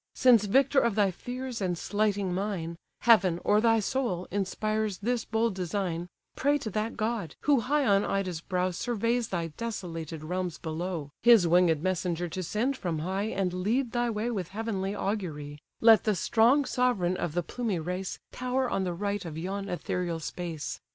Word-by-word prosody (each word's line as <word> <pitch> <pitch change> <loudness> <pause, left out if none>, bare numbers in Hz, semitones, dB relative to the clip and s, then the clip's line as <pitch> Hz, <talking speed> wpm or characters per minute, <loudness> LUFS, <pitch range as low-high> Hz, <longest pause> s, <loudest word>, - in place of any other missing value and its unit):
Since 235 -5 +5
victor 270 +6 +4
of 235 -5 +1
thy 200 -3 +3
fears, 245 +4 -6
and 180 -2 0
slighting 205 -1 0
mine, 180 -4 -2 0.3
Heaven, 195 -7 +5
or 210 +1 +4
thy 225 -1 +4
soul, 215 -5 -1
inspires 215 +1 -1
this 235 +2 -1
bold 225 0 +1
design; 180 -2 -2 0.3
Pray 285 +2 +2
to 220 -7 -5
that 215 +3 -2
god, 215 -7 -2
who 285 -3 +4
high 280 +4 +1
on 200 -1 +4
Ida's 185 -4 -2
brow 180 +1 -1
Surveys 230 +4 -1
thy 170 -3 -2
desolated 165 -8 -5
realms 180 0 -3
below, 160 -2 -4
His 230 -7 +7
winged 170 -2 +4
messenger 180 -2 -1
to 185 - -4
send 225 +10 -1
from 175 -7 -2
high, 190 +6 -2
And 195 -4 -1
lead 225 +7 0
thy 240 0 0
way 225 +2 -1
with 190 -7 -3
heavenly 200 -2 -3
augury: 155 -9 -3 0.2
Let 225 -1 +7
the 215 -2 +2
strong 240 - +3
sovereign 245 -9 +1
of 170 -4 -3
the 175 - +1
plumy 225 0 -2
race 180 +3 -3
Tower 255 0 -1
on 190 - 0
the 180 - -1
right 205 +2 -2
of 160 -3 -6
yon 195 +4 -4
ethereal 175 -1 -2
space. 165 -1 -5
200 Hz, 170 wpm, -28 LUFS, 175-230 Hz, 0.3 s, His